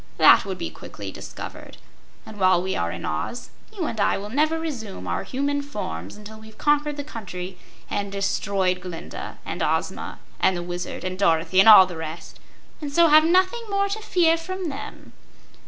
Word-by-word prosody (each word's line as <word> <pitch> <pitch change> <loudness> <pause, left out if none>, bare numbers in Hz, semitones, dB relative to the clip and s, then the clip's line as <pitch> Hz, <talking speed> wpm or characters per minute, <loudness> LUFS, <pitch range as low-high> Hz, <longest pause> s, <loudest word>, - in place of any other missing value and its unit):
That - - +7
would 190 -2 -4
be 170 -2 -4
quickly 100 -2 -8
discovered. - - -9 0.5
And 215 -1 -11
while 185 -2 +5
we 190 +1 -2
are 85 0 -1
in 85 0 -6
Oz 75 - -4 0.2
you 390 -6 -4
and 225 - -4
I - - +2
will 205 +2 -7
never 310 +5 +2
resume 225 - -5
our 85 -1 -2
human 285 +2 -1
forms 100 - -6
until 215 +1 -11
we've 220 0 -14
conquered 295 0 +1
the 285 - -3
country 185 -9 -7 0.3
and 200 -1 -3
destroyed 195 -2 0
Glinda, 180 -2 -7
and - - -4
Ozma, - - -1 0.2
and 190 -1 +3
the 175 - -4
Wizard, 175 0 -5
and 185 0 -4
Dorothy, 165 0 +3
and 195 - +8
all 195 -3 +11
the 180 -2 -8
rest, 160 +1 -7 0.4
and 290 -2 -4
so 335 +3 +5
have 310 +1 +7
nothing 370 +7 +3
more 400 0 +1
to 430 +2 -3
fear 345 -6 +3
from 370 +1 -4
them." 280 0 -9
210 Hz, 185 wpm, -24 LUFS, 180-300 Hz, 0.5 s, all